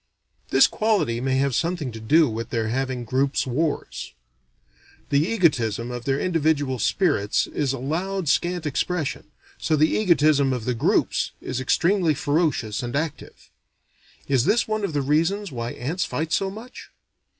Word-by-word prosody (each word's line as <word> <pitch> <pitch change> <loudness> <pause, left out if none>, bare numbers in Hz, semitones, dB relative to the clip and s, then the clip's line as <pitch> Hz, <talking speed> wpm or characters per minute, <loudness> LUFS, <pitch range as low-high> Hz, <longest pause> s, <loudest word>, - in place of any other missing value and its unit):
This - - +6
quality 205 - 0
may 130 0 0
have 135 0 +1
something 165 -2 -1
to 110 - -8
do 150 +8 +4
with 115 0 -4
their 110 -2 -1
having 130 0 -2
groups 135 +4 0
wars. 145 +4 -3 1.0
The 140 - +4
egotism 125 - +1
of 120 0 -6
their 135 0 0
individual 150 -7 0
spirits 145 - +1
is 140 -3 -2
allowed 165 +8 -3
scant 175 +3 0
expression, 150 0 -2 0.3
so 155 - +1
the 155 +1 +3
egotism 155 -8 +3
of 120 -3 -4
the 125 - 0
groups 115 - +1
is 130 0 -4
extremely 170 +4 +2
ferocious 145 -8 0
and 120 0 -4
active. 155 0 -5 0.8
Is 135 -3 +2
this 235 - +2
one 215 -1 -2
of 195 - -2
the 145 -1 0
reasons 165 +7 0
why 120 -2 -4
ants 160 +9 -2
fight 155 +5 -3
so 195 +3 +1
much? 225 +6 -10
145 Hz, 150 wpm, -24 LUFS, 125-170 Hz, 1.0 s, This